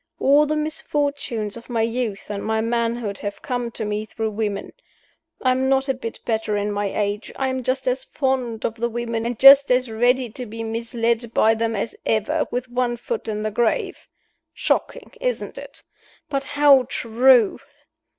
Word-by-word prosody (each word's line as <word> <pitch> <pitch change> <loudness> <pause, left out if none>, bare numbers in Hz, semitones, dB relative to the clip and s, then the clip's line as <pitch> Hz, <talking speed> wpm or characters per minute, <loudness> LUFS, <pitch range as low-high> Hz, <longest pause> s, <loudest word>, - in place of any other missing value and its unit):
All 290 +2 +4
the 305 - 0
misfortunes 285 -8 -2
of 235 +1 -12
my 230 -2 0
youth 225 -3 -3
and 200 -1 -4
my 220 0 0
manhood 230 -2 -1
have 205 0 -6
come 245 -2 -2
to 220 - -3
me 210 0 -2
through 220 0 -4
women. 205 -2 -3 0.7
I 255 - +4
am 260 +1 +1
not 270 0 +2
a 270 - +2
bit 230 -3 -7
better 220 -2 -1
in 205 +1 -1
my 205 0 -1
age 205 +1 -2
I 265 -1 -1
am 260 0 -2
just 255 +1 -2
as 255 +1 0
fond 255 -5 -2
of 225 - -1
the 235 +1 -2
women 230 -1 -3
and 240 -1 -3
just 275 +1 +8
as 250 -1 +2
ready 245 +3 +2
to 250 +2 -7
be 225 +2 -6
misled 230 +1 -1
by 220 +1 +5
them 225 0 -1
as 205 +3 -3
ever, 225 +9 0
with 250 +1 -3
one 245 -1 -1
foot 455 - -4
in 215 -1 -3
the 215 - -1
grave. 230 +1 -1 0.5
Shocking, - - -1
isn't - - -2
it? - - -11 0.5
But 275 -1 -2
how 285 -3 +5
true! 235 -2 +3
235 Hz, 180 wpm, -22 LUFS, 220-260 Hz, 0.7 s, just